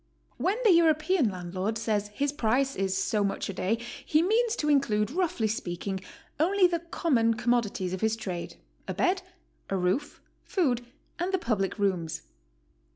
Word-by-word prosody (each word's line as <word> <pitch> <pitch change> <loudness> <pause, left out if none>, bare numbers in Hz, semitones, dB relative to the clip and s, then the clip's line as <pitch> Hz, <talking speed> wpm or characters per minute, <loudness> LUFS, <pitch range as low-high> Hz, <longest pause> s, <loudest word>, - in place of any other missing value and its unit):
When 390 +4 +1
the 435 - +6
European 320 - +4
landlord 185 +3 -3
says 215 -2 0
his 275 +7 -1
price 270 +1 +1
is 190 -1 0
so 205 +2 +1
much 200 0 -2
a - - -3
day, 195 +4 0 0.3
he 310 +2 +3
means 450 +4 +2
to 300 - -2
include, 245 -7 +2
roughly 320 -9 0
speaking, 190 -2 -3 0.4
only 370 +4 +4
the 345 -1 +2
com 335 -1 -2
mon 230 -2 +4
commodities 220 -6 0
of 185 - -4
his 220 0 +2
trade, 185 -6 -5 0.2
— - - -38
a - - -3
bed, 370 +1 +2 0.5
a 195 - 0
roof, 185 +11 -1 0.2
food, 255 - 0 0.4
and 355 +2 -1
the 380 - +2
public 215 - -1
rooms. 185 -6 -1
230 Hz, 165 wpm, -28 LUFS, 195-325 Hz, 0.5 s, the